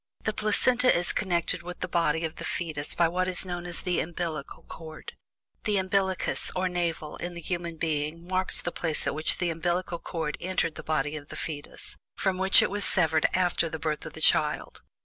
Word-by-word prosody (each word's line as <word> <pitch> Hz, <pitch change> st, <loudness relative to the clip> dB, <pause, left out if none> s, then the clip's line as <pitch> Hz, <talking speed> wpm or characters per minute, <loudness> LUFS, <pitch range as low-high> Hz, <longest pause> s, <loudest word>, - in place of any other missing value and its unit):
The 215 Hz, -, 0 dB
placenta 245 Hz, +4 st, +4 dB
is 175 Hz, 0 st, +3 dB
connected 175 Hz, -2 st, 0 dB
with 175 Hz, +1 st, -8 dB
the 185 Hz, -, -1 dB
body 165 Hz, -2 st, +1 dB
of 160 Hz, -, -5 dB
the -, -, -6 dB
fetus 155 Hz, -4 st, -2 dB
by 170 Hz, -, +4 dB
what 180 Hz, +2 st, 0 dB
is 185 Hz, 0 st, -1 dB
known 175 Hz, -1 st, -4 dB
as 175 Hz, -, 0 dB
"the 180 Hz, -2 st, +1 dB
umbillical 160 Hz, -3 st, -4 dB
cord." 155 Hz, -1 st, -9 dB, 0.5 s
The 210 Hz, -2 st, +2 dB
"umbillicus" 190 Hz, 0 st, 0 dB
or 185 Hz, 0 st, +1 dB
"navel" 170 Hz, -4 st, -2 dB
in 175 Hz, 0 st, -5 dB
the -, -, -5 dB
human 170 Hz, -1 st, -3 dB
being 155 Hz, +1 st, -1 dB
marks 185 Hz, 0 st, +2 dB
the 175 Hz, -, -1 dB
place 160 Hz, -3 st, -2 dB
at -, -, 0 dB
which 155 Hz, +2 st, 0 dB
the 175 Hz, -1 st, 0 dB
umbillical 175 Hz, +1 st, -1 dB
cord 160 Hz, -3 st, -3 dB
entered 180 Hz, -3 st, 0 dB
the -, -, -8 dB
body 155 Hz, -1 st, 0 dB
of 145 Hz, -2 st, -7 dB
the -, -, -8 dB
fetus, 145 Hz, -2 st, -6 dB, 0.2 s
from 190 Hz, -2 st, 0 dB
which 190 Hz, +1 st, +7 dB
it -, -, 0 dB
was 205 Hz, 0 st, -2 dB
severed 160 Hz, -5 st, +3 dB
after 175 Hz, -2 st, +2 dB
the 160 Hz, -, -4 dB
birth 155 Hz, -1 st, -2 dB
of -, -, -9 dB
the -, -, -9 dB
child. -, -, +2 dB
175 Hz, 205 wpm, -28 LUFS, 160-185 Hz, 0.5 s, which